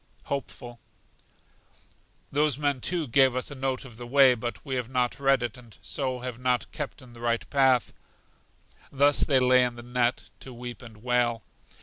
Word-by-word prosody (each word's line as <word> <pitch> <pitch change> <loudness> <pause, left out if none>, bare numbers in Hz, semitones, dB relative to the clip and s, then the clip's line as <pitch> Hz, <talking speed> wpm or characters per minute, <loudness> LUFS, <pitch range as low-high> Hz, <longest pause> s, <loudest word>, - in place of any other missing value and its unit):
Hopeful. 120 -3 -6 1.5
Those 145 -1 +2
men, 145 -3 0
too, 175 +2 -1
gave 130 +1 +4
us 130 +3 -2
a - - -5
note 135 -1 -3
of 120 -4 -12
the 120 0 -8
way, 135 0 +6
but 120 +3 -6
we 135 - -4
have 125 -2 -2
not 125 0 -1
read 135 -2 +3
it, 120 0 -4
and 120 -3 -16
so 130 -3 -3
have 125 -2 -5
not 125 -1 0
kept 145 -2 -6
in 120 -2 -15
the 120 - -13
right 115 -1 -1
path. 130 -3 +3 1.0
Thus 145 +1 +3
they 135 -3 +3
lay 125 0 +5
in 120 -1 -1
the 120 - -10
net 125 0 -1
to 130 -2 -10
weep 120 0 -8
and 110 -3 -13
wail. 120 -2 +1
125 Hz, 185 wpm, -27 LUFS, 120-135 Hz, 1.5 s, way